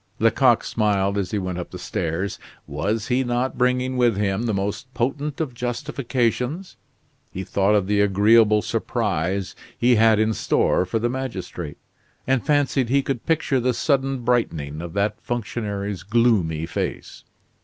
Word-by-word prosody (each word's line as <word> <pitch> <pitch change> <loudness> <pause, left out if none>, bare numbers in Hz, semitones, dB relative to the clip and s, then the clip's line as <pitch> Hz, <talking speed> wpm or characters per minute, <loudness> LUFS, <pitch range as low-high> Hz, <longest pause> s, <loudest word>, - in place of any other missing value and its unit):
Lecoq 120 +2 +3
smiled 100 -3 0
as 100 -3 -1
he 105 - -2
went 95 -2 -3
up 90 - -6
the - - -8
stairs. 85 +5 -3 0.3
Was 105 - -2
he 130 +1 +2
not 125 +1 -1
bringing 125 +1 +1
with 120 -4 +3
him 105 +3 0
the - - +1
most 100 +6 -3
potent 140 +4 -2
of 150 -6 -2
justifications? 125 - -2 0.6
He 95 - -5
thought 100 +2 +2
of 100 -3 +2
the 100 +1 +2
agreeable 105 +2 +4
surprise 100 -5 -1 0.2
he 120 0 +4
had 110 0 +5
in 110 +1 +2
store 95 - +1
for 100 - -1
the 115 +2 0
magistrate, 100 - -5 0.5
and 130 -3 +1
fancied 140 -4 +1
he 140 +2 +3
could 130 -4 -4
picture 155 -4 +1
the 125 0 0
sudden 135 -2 0
brightening 80 -12 -1
of 85 -1 -7
that 105 +2 -1
functionary's 105 -5 -3
gloomy 100 -8 +2
face. - - -5
115 Hz, 155 wpm, -23 LUFS, 100-125 Hz, 0.6 s, had